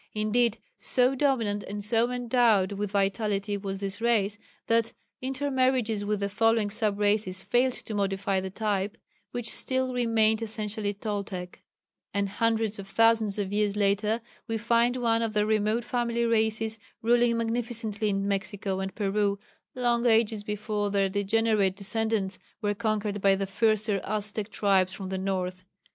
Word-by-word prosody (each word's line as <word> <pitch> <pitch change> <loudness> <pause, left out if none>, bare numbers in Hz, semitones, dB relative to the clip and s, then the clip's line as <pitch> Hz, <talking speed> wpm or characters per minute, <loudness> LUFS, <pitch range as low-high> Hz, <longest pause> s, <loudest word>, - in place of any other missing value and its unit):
Indeed 220 +2 +1 0.2
so 255 0 +3
dominant 250 -7 +1
and 205 +1 -5
so 230 +2 +2
endowed 235 -5 +2
with 205 0 -3
vitality 200 +1 0
was 195 -1 -4
this 200 +2 -4
race 215 -3 +1 0.3
that 230 0 +1 0.3
intermarriages 260 -5 0
with 205 0 -1
the 200 - +1
following 225 0 +2
sub 215 -2 0
races 205 -2 +1
failed 250 +1 +2
to 220 - -6
modify 195 -1 0
the 190 - -4
type, 205 0 -2 0.3
which 245 -1 -4
still 260 -1 +1
remained 225 -2 +2
essentially 210 -2 -3
Toltec; 200 -4 -5 0.5
and 200 -1 0
hundreds 225 0 0
of 195 - -7
thousands 225 -1 +3
of 200 -1 -2
years 205 -1 +1
later 210 +2 +1 0.3
we 225 -1 -1
find 235 +2 +2
one 230 -2 +1
of 225 -2 -1
their 210 -1 +2
remote 215 +2 +1
family 235 0 -1
races 220 -1 +1 0.2
ruling 240 0 +3
magnificently 230 -2 -2
in 195 0 -1
Mexico 195 -1 -2
and 190 -1 -4
Peru, 200 -1 0 0.4
long 240 -1 +1
ages 220 -2 +3
before 210 0 -2
their 195 -1 +1
degenerate 205 0 +1
descendants 210 -1 -1 0.2
were 205 -1 0
conquered 210 -1 -2
by 195 0 +5
the 195 0 -2
fiercer 210 0 +1
Aztec 210 0 -2
tribes 195 -2 +2
from 190 -1 -6
the 190 0 -2
north. 185 -1 -2
215 Hz, 150 wpm, -27 LUFS, 200-230 Hz, 0.5 s, by